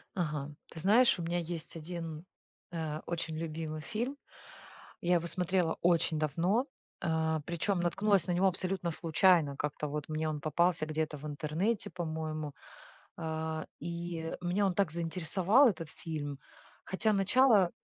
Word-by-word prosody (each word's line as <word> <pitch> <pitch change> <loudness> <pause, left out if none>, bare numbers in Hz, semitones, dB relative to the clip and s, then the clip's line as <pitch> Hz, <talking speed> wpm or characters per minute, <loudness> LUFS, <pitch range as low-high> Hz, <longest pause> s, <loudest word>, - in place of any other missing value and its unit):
Ага. 150 -5 -2 0.2
Ты 160 - -8
знаешь, 215 +4 +5
у - - -2
меня 175 +1 0
есть 170 0 -5
1, 165 0 -6 0.5
э, 155 -2 -3
очень 165 -2 -3
любимый 155 -1 -4
фильм. 235 - -3 0.8
Я 175 +1 +3
его 170 -1 +1
смотрела 180 -1 +1
очень 170 -2 +3
давно, 175 - +1 0.3
а, 160 -2 +1
причем 175 +2 0
наткнулась 195 +3 +2
на 180 - 0
него 185 +2 +4
абсолютно 185 -1 -1
случайно. 165 -2 +3
Как-то 150 +1 -2
вот 150 0 -4
мне 155 0 -1
он 150 -1 -2
попался 165 +2 +2
где-то 155 -1 -2
в 150 - -8
интернете, 155 +9 -1
по-моему. 155 -3 -3 0.6
А, 160 0 -3
и 170 -1 -4
меня 180 +3 +1
он 185 - +1
так 190 -4 +1
заинтересовал 180 - +3
этот 165 -6 -2
фильм, 145 -4 -5 0.5
хотя 215 +3 +1
начало 200 -1 +5
170 Hz, 140 wpm, -32 LUFS, 155-185 Hz, 0.8 s, знаешь